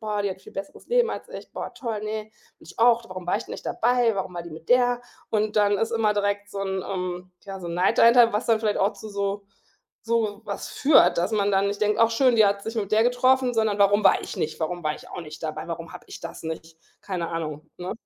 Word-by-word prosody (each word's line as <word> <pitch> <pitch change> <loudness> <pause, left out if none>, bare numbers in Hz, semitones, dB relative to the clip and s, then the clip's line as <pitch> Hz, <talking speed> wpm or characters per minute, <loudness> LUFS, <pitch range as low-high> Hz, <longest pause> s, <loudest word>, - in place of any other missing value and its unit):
„Boah, 210 -2 -2
die 200 - 0
hat 190 0 -8
viel - - -14
besseres 195 0 -8
Leben 480 -1 +3
als - - -6
ich. - - -10
Boah, - - -6
toll, 230 -5 -4
ne, 215 0 -3 0.3
will - - -18
ich - - -14
auch. 235 0 +4
Warum 185 -1 -7
war 175 - +2
ich - - -5
denn - - -9
nicht - - -8
dabei? 240 -1 +2
Warum 190 -2 -3
war 175 - -4
die 170 - -10
mit 160 +1 -11
der?“ 245 -1 +4 0.3
Und 215 -1 0
dann 205 -1 +4
ist 225 +2 0
immer 220 -2 +2
direkt 205 0 -1
so 200 - -6
'n 190 -1 -2
ähm, 180 -1 -4
ja, 195 -1 -7
so 175 - -7
'n 170 - -4
Neid 180 +2 +2
dahinter, 235 -1 +7
was 210 +3 -1
dann 225 -2 +3
vielleicht 215 -2 0
auch 195 +2 +1
zu 215 - -9
so 200 0 -2 0.6
so 225 -3 0
was 200 -2 -5
führt, 270 - +4
dass 175 - +1
man 205 -1 +2
dann 195 +1 +3
nicht 200 0 -4
denkt: 210 0 +2
„Ach 230 0 +5
schön, 245 0 +3
die 215 -2 +6
hat 200 0 0
sich 225 +1 -5
mit 200 -3 -2
der 215 +1 +5
getroffen“, 255 +1 +3
sondern 220 -2 +1
„Warum 205 +1 +4
war - - +5
ich - - -7
nicht? 155 - -2
Warum 175 +2 -2
war 150 - 0
ich - - -13
auch - - -6
nicht 155 -1 -10
dabei? 155 0 -5
Warum 165 0 -6
habe - - -10
ich - - -9
das 165 - -8
nicht?“ 160 0 -7 0.2
Keine 180 -4 -3
Ahnung, 155 -2 -5
ne? 180 +1 -4
205 Hz, 265 wpm, -25 LUFS, 180-225 Hz, 0.6 s, dahinter